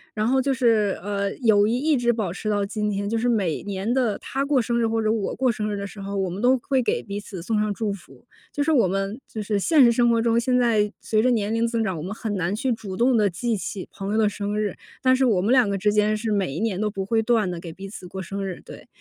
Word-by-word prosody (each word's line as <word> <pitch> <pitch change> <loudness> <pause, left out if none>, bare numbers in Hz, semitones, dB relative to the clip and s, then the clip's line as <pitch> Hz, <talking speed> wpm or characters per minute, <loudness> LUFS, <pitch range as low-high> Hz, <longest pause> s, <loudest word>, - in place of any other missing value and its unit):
然 215 0 0
后 265 +2 +3
就 275 +1 0
是， 225 -6 +2
呃， 200 0 -1
友 215 -5 +3
谊 230 +3 +1
一 300 +3 +2
直 240 -2 +2
保 215 -7 -2
持 215 +2 -4
到 205 -1 +1
今 210 +1 -2
天， 200 0 -2
就 225 +2 0
是 245 +2 +1
每 195 -9 0
年 200 +3 -2
的 245 -5 +1
她 270 +2 -3
过 280 -1 +2
生 235 0 0
日 230 - +2
或 225 0 0
者 215 0 +1
我 220 -3 -1
过 260 -1 +2
生 215 -1 -3
日 205 - -2
的 200 - -4
时 200 0 -9
候， 200 +1 -4
我 190 -1 0
们 185 +3 -5
都 255 +2 +4
会 270 -2 +2
给 240 - -1
彼 200 0 -5
此 195 -4 -8
送 210 +2 0
上 210 - 0
祝 205 0 -2
福。 200 - -14 0.3
就 290 - -1
是 320 - +1
我 245 -11 +4
们 195 +6 -2
就 215 - -5
是 205 0 0
现 300 - +5
实 235 - +6
生 240 0 +3
活 230 -1 +3
中， 230 0 +2
现 250 +1 +1
在 220 -4 +2
随 215 -1 +1
着 250 - +3
年 220 -3 0
龄 230 +1 +1
增 230 -1 -1
长， 190 -4 -1
我 155 - -5
们 185 +5 -5
很 220 -1 -4
难 180 +2 -1
去 260 +3 -1
主 195 -4 -7
动 250 +1 +3
地 210 -3 +3
记 225 +7 -2
起 190 -1 -5
朋 200 +1 -4
友 - - +1
的 220 -1 +4
生 205 0 -2
日。 210 -3 -1 0.3
但 260 0 +5
是 260 +1 +2
我 210 -7 +2
们 210 +5 +1
两 255 -5 +5
个 200 - -1
之 205 +2 +1
间 210 0 +2
是 220 0 -3
每 195 -7 0
一 - - -3
年 210 -3 -1
都 215 - +1
不 195 -2 -4
会 225 +2 +1
断 220 -4 +1
地 175 - -5
给 170 -1 -8
彼 195 +4 -9
此 190 -2 -9
过 190 +1 -6
生 195 +3 -5
日， 190 -2 -5
对。 - - -12
215 Hz, 320 characters per minute, -24 LUFS, 200-235 Hz, 0.3 s, 实